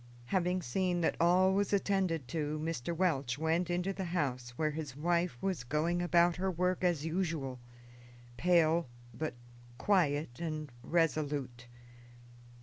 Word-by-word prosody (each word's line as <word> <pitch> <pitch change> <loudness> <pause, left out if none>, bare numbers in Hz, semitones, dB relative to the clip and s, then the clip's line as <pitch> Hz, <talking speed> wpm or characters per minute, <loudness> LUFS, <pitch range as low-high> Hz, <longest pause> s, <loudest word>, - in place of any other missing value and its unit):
Having 180 +3 0
seen 175 +6 0
that 165 - +1
all 185 +2 +5
was 200 0 +1
attended 190 -8 +1
to, 150 0 -2
Mr. 160 -2 -3
Welch 145 -8 0
went 160 +3 0
into 180 +2 0
the 190 0 -4
house, 140 -8 -2
where 155 -1 +1
his 150 -3 -5
wife 170 -1 0
was 190 -8 -1
going 155 +7 0
about 175 0 +3
her 190 +1 0
work 180 +1 0
as 170 -4 +1
usual, 160 -7 -2 0.8
pale, 170 -1 +3 0.3
but 155 +2 -4 0.4
quiet 150 -9 +1
and 155 -4 -4
resolute. 145 -6 -1
165 Hz, 135 wpm, -33 LUFS, 150-180 Hz, 0.8 s, all